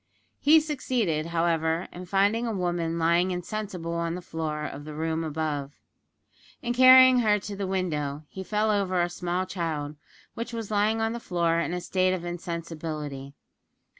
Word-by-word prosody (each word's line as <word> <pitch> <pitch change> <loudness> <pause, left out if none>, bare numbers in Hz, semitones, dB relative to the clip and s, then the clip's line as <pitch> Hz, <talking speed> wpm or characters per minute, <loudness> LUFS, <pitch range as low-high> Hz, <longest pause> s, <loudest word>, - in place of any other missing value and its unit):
He 310 +3 +6
succeeded, 250 - -1
however, 165 0 0
in 180 +1 -9
finding 205 +5 +2
a - - -1
woman 175 -2 -1
lying 170 +2 +3
insensible 180 -1 -4
on 170 0 -1
the 180 - -6
floor 155 -2 -4
of 145 -1 -6
the 150 0 -8
room 160 +1 -1
above. 150 -3 -3 0.9
In 240 0 -1
carrying 255 0 +8
her 215 -3 +3
to 205 0 -6
the 195 -1 -3
window 155 -6 -2
he 190 - -7
fell 215 +2 +1
over 195 -3 +1
a 175 0 +2
small 180 +1 -2
child, 155 -5 -3 0.4
which 235 +1 -6
was 225 -2 -5
lying 215 +2 +2
on 225 0 0
the 235 - -4
floor 170 -5 0
in 170 - -1
a 180 0 -3
state 185 +1 +1
of 175 -1 -6
insensibility. 160 -5 -5
175 Hz, 165 wpm, -27 LUFS, 160-205 Hz, 0.9 s, carrying